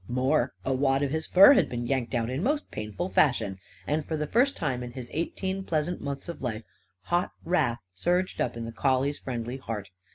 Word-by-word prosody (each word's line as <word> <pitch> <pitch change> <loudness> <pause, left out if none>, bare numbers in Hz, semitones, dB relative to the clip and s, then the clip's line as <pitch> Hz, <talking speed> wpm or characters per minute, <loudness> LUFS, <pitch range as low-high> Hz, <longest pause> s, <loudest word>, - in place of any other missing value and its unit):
More, 130 +5 +1
a 135 - +1
wad 135 +1 +2
of 140 - -1
his 160 +1 -2
fur 195 +9 +9
had 265 - +3
been 120 -1 -3
yanked 125 -2 -1
out 115 0 0
in 130 +4 -2
most 290 +8 0
painful 110 - -4
fashion. 100 - +2 0.3
And, 150 +7 0
for 160 +2 -3
the 150 - -1
first 250 - +2
time 135 -6 -1
in 120 -1 -6
his 125 -2 -8
eighteen 190 +4 -2
pleasant 170 0 -1
months 140 -1 -5
of 170 - -6
life, 115 -4 -3 0.4
hot 175 - 0
wrath 155 -9 +1
surged 180 - 0
up - - -1
in 115 - -4
the 115 - -5
collie's 135 +4 +1
friendly 120 0 -4
heart. 105 -6 -6
135 Hz, 205 wpm, -28 LUFS, 120-170 Hz, 0.4 s, fur